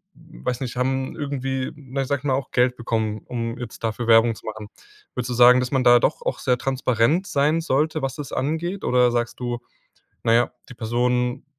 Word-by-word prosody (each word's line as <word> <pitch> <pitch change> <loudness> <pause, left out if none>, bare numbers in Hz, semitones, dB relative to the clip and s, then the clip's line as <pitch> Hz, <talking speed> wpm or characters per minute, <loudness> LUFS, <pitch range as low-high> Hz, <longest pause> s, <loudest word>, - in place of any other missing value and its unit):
m 160 +1 -16
weiß 125 +1 -1
nicht, 125 -2 -4
haben 130 +1 -1
irgendwie, 135 -3 -2
ne, 135 -2 -4
sage 140 +1 -1
ich - - -23
mal 140 -2 +1
auch 135 +1 -2
Geld 125 0 +2
bekommen, 110 -2 -2
um 115 -1 -4
jetzt 120 -2 -8
dafür 115 +1 -2
Werbung 115 0 +5
zu - - -15
machen. 110 -1 -7 0.5
Würdest 125 0 -3
du - - 0
sagen, 125 +1 +7
dass 125 0 -2
man 130 -2 +2
da 120 0 +7
doch 485 - 0
auch - - -2
sehr 125 -1 +1
transparent 130 - +1
sein 150 +1 +2
sollte, 155 0 0
was 135 -1 -2
das 145 -2 -7
angeht? 165 +7 -2
Oder 125 -1 +4
sagst 120 0 -1
du: 120 -1 -2 0.6
„Na 115 - +3
ja, 120 +1 +3 0.2
die - - -10
Person 125 +2 -1
125 Hz, 205 wpm, -23 LUFS, 120-140 Hz, 0.6 s, sagen